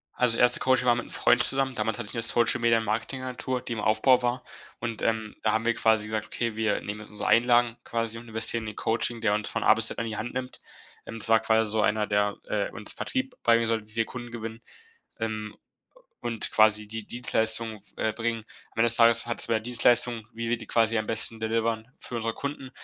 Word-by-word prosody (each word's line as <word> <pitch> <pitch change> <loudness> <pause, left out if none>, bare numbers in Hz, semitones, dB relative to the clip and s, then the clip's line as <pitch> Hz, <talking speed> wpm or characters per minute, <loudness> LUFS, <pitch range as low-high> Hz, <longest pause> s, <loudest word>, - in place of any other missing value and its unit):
Also, 120 -2 +2
1. 125 0 +4
Coaching 130 -1 +2
war 120 - +5
mit 120 - -4
'nem - - -15
Freund 125 - +3
zusammen. 135 -1 0
Damals 110 -1 -1
hatte 120 - -5
ich - - +1
'ne 115 - -2
Social-Media-Marketing-Agentur, 120 +2 0
die 125 - -6
im 115 - -3
Aufbau 125 +4 +3
war. 125 +1 -1 0.3
Und, 115 -2 -4
ähm, 110 -1 -1
da 110 - +2
haben 110 +1 0
wir 120 0 +2
quasi 110 -1 +2
gesagt: 110 0 -3
„Okay, 115 -2 -3
wir 110 -2 0
nehmen 105 +1 -6
jetzt 105 - -11
unsere 105 - -2
Einlagen 120 0 +4
quasi 115 -1 -3
und 120 0 -12
investieren 110 +1 0
die - - -4
in - - -23
Coaching, 115 +1 0
der 105 -2 +2
uns 105 0 -2
von - - -3
A - - +7
bis 115 -1 +1
Z - - -6
an 115 - -2
die 110 - -4
Hand 120 +4 -5
nimmt.“ 130 0 -5 0.5
Ähm, 115 - -7
das 110 - -3
war 115 0 +5
quasi 110 -1 +2
so 110 +1 +1
einer, 105 0 +1
der, 105 0 0
äh, 105 -1 -1
uns 105 - -5
Vertrieb 260 0 -3
beibringen 115 -1 +3
sollte, 110 -2 -1
wie 110 - -16
wir 115 - +2
Kunden 120 +1 -8
gewinnen 115 -1 -7 0.6
ähm, 110 -1 -4 0.7
und 115 -2 0
quasi 105 -1 +4
die 110 0 -6
Dienstleistung, 110 -3 0 0.2
äh, 110 - -1
bringen. 115 0 -3 0.3
Am - - -25
Ende 115 - +4
des 115 - +7
Tages 115 0 +5
hat 120 0 -3
es - - +1
über 110 -1 +2
Dienstleistung, 120 -1 +2
wie 115 0 -4
wir 120 - +2
die 110 -2 -10
quasi 115 -1 +2
am 110 - -2
besten 115 0 0
delivern 115 +1 -1
für 120 - -7
unsere 115 -1 -2
Kunden, 140 0 -6
115 Hz, 230 wpm, -27 LUFS, 110-120 Hz, 0.7 s, A